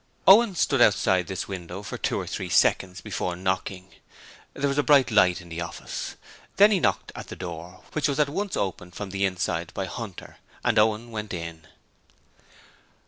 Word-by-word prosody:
Owen 205 0 +7
stood 135 -6 +2
outside 95 -4 +4
this 95 0 -4
window 95 0 -6
for - - -6
two - - -1
or - - -4
three - - -4
seconds 90 -1 +2
before 90 -4 -3
knocking. 95 0 -3 0.6
There 140 - 0
was 140 +1 0
a - - +6
bright 140 -4 +4
light 90 -4 +4
in 85 - -14
the 85 +1 -5
office. 85 0 -6 0.4
Then 205 +2 +7
he 200 - +3
knocked - - 0
at - - -8
the - - -7
door, 90 +3 -8
which 150 -3 +1
was 140 -1 -1
at 150 - +4
once 195 +7 -3
opened 90 -2 -3
from 100 -2 -6
the 100 0 0
inside 90 -3 -2
by 95 - -2
Hunter, 110 -2 -8 0.3
and - - +3
Owen 110 +2 +1
went 105 -3 -4
in. 85 -2 -7
95 Hz, 185 wpm, -26 LUFS, 90-135 Hz, 0.6 s, Owen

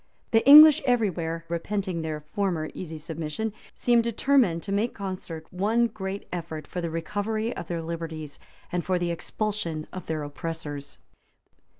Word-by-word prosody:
[*] - - -40
The 225 -1 +4
English, 305 +2 +11
everywhere 180 -10 0
repenting 180 +1 -2
their 155 -1 -4
former 160 0 -2
easy 165 -3 -6
submission, 160 +7 -4 0.2
seemed 240 -1 +3
determined 230 -6 +2
to 200 - -5
make 210 +4 +1
by - - -18
concert 185 -5 -5
one 215 +6 +2
great 200 -3 -5
effort 160 -3 -5
for 180 - -5
the 170 - -2
recovery 210 +7 -2
of 170 - -6
their 170 -1 -3
liberties, 160 -3 -6 0.3
and 175 -1 -1
for 185 0 +1
the 175 -1 -1
expulsion 170 -3 -3
of 185 -2 -7
their 155 -2 -2
oppressors. 145 -1 -6
175 Hz, 160 wpm, -26 LUFS, 160-210 Hz, 0.3 s, English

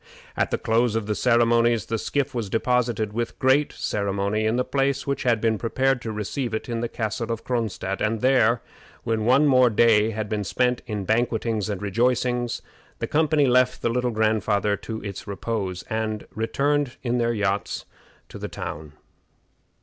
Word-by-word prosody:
At - - +1
the - - 0
close 115 0 +1
of 115 -2 -1
the 105 - -1
ceremonies 115 -1 +3
the 115 -1 -2
skiff 140 +4 -1
was 115 -5 -3
deposited 115 -2 0
with 115 +1 -3
great 135 +3 +3
ceremony 100 +1 -1
in 110 - +1
the 125 - +1
place 135 +1 0
which 140 0 -2
had 120 -3 +2
been 110 -1 +1
prepared 130 +2 +1
to 115 - -4
receive 110 +3 -3
it 110 - -4
in 120 -1 -2
the 120 0 -2
Castle 115 0 -3
of 115 0 -4
Cronstadt, 110 -5 -2
and 110 +1 0
there, 125 -2 +3 0.4
when 110 -1 -1
one 130 +5 +5
more 130 -3 +5
day 110 -1 +4
had 110 -1 -3
been 105 -1 -2
spent 125 +6 0
in 105 -3 -3
banquetings 110 -1 0
and 100 -1 -4
rejoicings, 120 +3 0 0.3
the - - -2
company 155 -1 +2
left 125 0 +2
the - - +2
Little 125 +1 0
Grandfather 110 -2 +1
to 110 +2 -6
his 100 +1 -7
repose, 100 -2 -3
and 110 -1 -3
returned 140 +4 0
in 125 -1 0
their 120 0 +1
yachts 100 -1 -1 0.4
to - - -9
the - - -5
town. 75 -1 -7
115 Hz, 175 wpm, -24 LUFS, 105-125 Hz, 0.4 s, one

